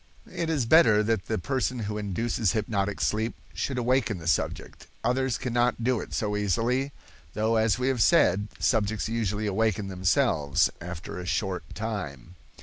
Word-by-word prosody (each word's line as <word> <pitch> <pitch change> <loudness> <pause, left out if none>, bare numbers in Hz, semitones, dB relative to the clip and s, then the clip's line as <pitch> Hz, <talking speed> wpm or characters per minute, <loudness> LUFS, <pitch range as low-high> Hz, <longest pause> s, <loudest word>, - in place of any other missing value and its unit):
It 165 -1 -2
is 145 -7 +1
better 115 -6 +6
that 110 -4 -1
the - - -1
person 130 +3 -1
who 105 -2 -3
induces 105 +1 -1
hypnotic 105 -2 -1
sleep 110 +2 0 0.2
should 135 - -2
awaken 125 -3 +1
the 80 - -10
subject. 85 - -2 0.2
Others 125 +2 +1
cannot 120 -1 0
do 125 -1 +2
it - - -9
so 105 -1 -1
easily, 115 +7 0 0.4
though 110 +2 +1
as 110 0 +2
we 125 +1 -1
have 130 -4 0
said, 105 - +4
subjects 110 -2 +1
usually 110 -2 -1
awaken 105 -1 0
themselves 85 -6 +2
after 90 0 -6
a 90 - -6
short 95 -6 -2
time. 90 - -5
110 Hz, 155 wpm, -27 LUFS, 100-120 Hz, 0.4 s, better